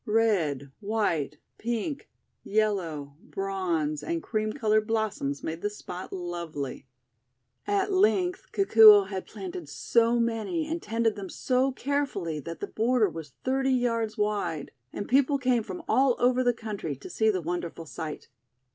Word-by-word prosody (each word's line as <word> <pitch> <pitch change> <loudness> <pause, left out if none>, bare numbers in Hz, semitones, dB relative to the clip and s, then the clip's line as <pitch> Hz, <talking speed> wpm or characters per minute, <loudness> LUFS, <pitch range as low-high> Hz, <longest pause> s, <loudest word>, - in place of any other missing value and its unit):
Red, 175 - +1
white, 205 -8 -1 0.2
pink, 240 +6 -3 0.3
yellow, 170 -10 -1
bronze, 185 - -2
and 165 +2 -3
cream 215 -1 -1
coloured 215 -4 +1
blossoms 215 -11 -1
made 160 +1 -4
the 205 - 0
spot 185 -3 -8
lovely. 170 -7 -5 0.8
At 400 -1 +1
length 380 +2 +2
Kikuo 215 - +7
had 190 -2 -5
planted 365 -1 -7
so 235 0 +2
many 235 +8 0
and 330 +2 -3
tended 225 0 0
them 195 -2 -6
so 260 +5 +1
carefully 255 - -2
that 165 +4 -7
the - - -1
border 225 -1 +2
was 160 -5 -8
thirty 265 0 +1
yards 230 -3 0
wide, 200 -8 -1 0.2
and 205 - -5
people 280 +2 +3
came 255 -3 +2
from 190 -4 -7
all 265 -2 +4
over 250 +1 +3
the 245 - +4
country 210 -10 -5
to 135 - -11
see 220 0 +1
the 195 -4 +1
wonderful 170 -1 -4
sight. 155 0 -6
215 Hz, 145 wpm, -28 LUFS, 170-245 Hz, 0.8 s, Kikuo